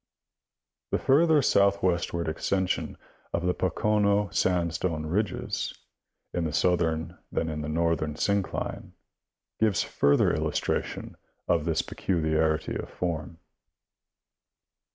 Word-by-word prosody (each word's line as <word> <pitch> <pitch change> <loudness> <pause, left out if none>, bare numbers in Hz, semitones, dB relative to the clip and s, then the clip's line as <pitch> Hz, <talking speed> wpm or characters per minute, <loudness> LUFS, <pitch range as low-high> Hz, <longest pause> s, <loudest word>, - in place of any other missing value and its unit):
The - - +1
further 155 +2 +4
soiithwestward 95 -6 +2
extension 95 +4 -1 0.4
of 85 - -1
the 90 - +2
Pocono 100 +2 +1
sandstone 85 -3 0
ridges 100 +5 -2 0.6
in 85 - -1
the 75 - -2
southern 85 -1 +1
than 80 - -1
in 75 -1 -3
the 75 - -4
northern 80 -1 0
syncline 100 +3 -2 0.7
gives 110 -4 +2
further 70 0 +3
illustration - - -2 0.3
of 85 -3 +2
this 80 -2 +1
peculiarity 80 -3 0
of - - -5
form. 80 -3 -4
85 Hz, 100 wpm, -27 LUFS, 80-100 Hz, 0.7 s, further